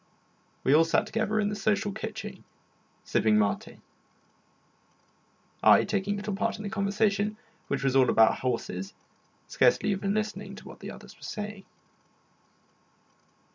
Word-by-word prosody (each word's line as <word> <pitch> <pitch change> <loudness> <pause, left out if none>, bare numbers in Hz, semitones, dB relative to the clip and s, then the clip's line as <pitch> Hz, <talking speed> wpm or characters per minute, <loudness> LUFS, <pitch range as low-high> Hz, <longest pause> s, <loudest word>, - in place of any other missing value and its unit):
We 135 - +4
all 160 +2 +7
sat 165 - +2
together 220 -1 -1
in 205 -1 +1
the 210 - -3
social 205 0 0
kitchen, - - -6 0.6
sipping 110 -1 +2
maté; 105 -1 -1 1.8
I - - +7
taking 205 0 -1
little 205 0 -4
part 225 +3 -1
in 210 - -8
the 200 - -5
conversation, 205 +1 0 0.3
which 135 -1 -2
was 135 -1 +1
all 130 -2 +5
about 110 0 +4
horses, 100 -7 -3 0.5
scarcely 210 - +3
even 195 +1 -1
listening 215 0 -3
to - - -12
what - - -11
the - - -7
others - - -11
were - - -26
saying. 210 -2 -6
200 Hz, 135 wpm, -28 LUFS, 135-210 Hz, 1.8 s, all